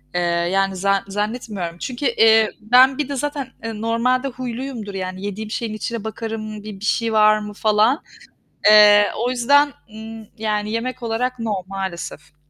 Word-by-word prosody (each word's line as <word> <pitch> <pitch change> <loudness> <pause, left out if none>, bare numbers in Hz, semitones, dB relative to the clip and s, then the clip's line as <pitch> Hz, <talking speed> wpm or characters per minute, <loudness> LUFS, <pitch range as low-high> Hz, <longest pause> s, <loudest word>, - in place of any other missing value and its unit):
eee, 175 - +1 0.3
yani, 195 0 +1
za 195 +1 +1
zannetmiyorum 205 -4 -4
çünkü, 255 +8 -5
eee, 225 -2 +4
ben 255 +4 +5
bir 290 -2 -2
de 280 - -3
zaten, 285 -1 -3 0.2
eee, 225 -1 -5
normalde 250 +4 +1
huyluyumdur, 245 -4 -6
yani, 185 +1 -5
yediğim 210 +2 -5
şeyin 225 -2 -3
içine 220 +1 -4
bakarım, 220 -1 -6
bir 210 -3 -8
bir 210 - -6
şey 230 0 0
var 215 0 +5
mı 210 0 -7
falan. 215 +7 +2 0.6
Eee, 210 -1 +7
o 240 +2 0
yüzden, 285 +4 +3 0.2
ımm, 220 0 -9
yani, 210 -1 -2
yemek 245 +2 -3
olarak 245 +2 -2
no, 225 -2 -2
maalesef. 170 -5 -6
220 Hz, 160 wpm, -20 LUFS, 205-245 Hz, 0.6 s, Eee